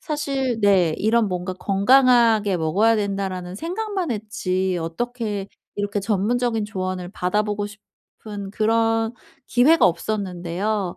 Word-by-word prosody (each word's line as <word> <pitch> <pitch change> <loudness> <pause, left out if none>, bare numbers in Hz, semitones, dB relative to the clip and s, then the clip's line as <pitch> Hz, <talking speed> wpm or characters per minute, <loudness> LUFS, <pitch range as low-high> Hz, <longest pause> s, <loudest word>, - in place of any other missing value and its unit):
사실 270 -6 -2
네 185 -6 +4
이런 220 0 +2
뭔가 180 0 -3
'건강하게 220 0 +4
먹어야 200 +8 +2
된다.'라는 195 -3 -3
생각만 375 - -3
했지 190 -4 -2
어떻게 210 +3 -4 0.3
이렇게 205 0 -2
전문적인 225 +3 0
조언을 185 -3 -4
받아보고 205 +2 -1
싶은 205 -1 -11
그런 225 +1 +1 0.3
기회가 290 +7 +5
없었는데요. 185 +1 -2
210 Hz, 285 characters per minute, -22 LUFS, 185-230 Hz, 0.3 s, 기회가